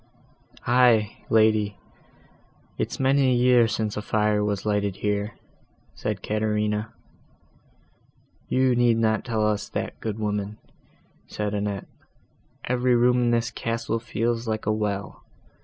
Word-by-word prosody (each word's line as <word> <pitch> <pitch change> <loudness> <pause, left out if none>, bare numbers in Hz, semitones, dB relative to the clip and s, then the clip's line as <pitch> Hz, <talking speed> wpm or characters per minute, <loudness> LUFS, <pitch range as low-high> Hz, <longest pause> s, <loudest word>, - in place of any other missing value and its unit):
"Aye, 120 -4 +3
lady, 110 -2 +3 1.0
it's - - -2
many 135 0 +3
a 125 - +3
year 120 -1 +5
since 110 -2 -2
a 105 - -3
fire 105 0 +1
was 105 -1 -2
lighted 100 -2 0
here," 105 +2 -2 0.6
said - - -4
Caterina. 105 0 -1 1.6
"You 130 -1 +2
need 120 -1 +3
not 110 -1 +1
tell 110 -4 0
us 105 -1 -1
that, - - -4
good 110 -2 -4
woman," 105 -1 -3 0.7
said 105 -1 -3
Annette; 100 -1 -2 0.8
"every 125 0 +2
room 125 +1 +3
in 120 - +2
the 120 0 +1
castle 115 0 -2
feels 115 0 -2
like 110 -1 -2
a 110 - +2
well. 105 -2 -3
110 Hz, 125 wpm, -25 LUFS, 105-120 Hz, 1.6 s, year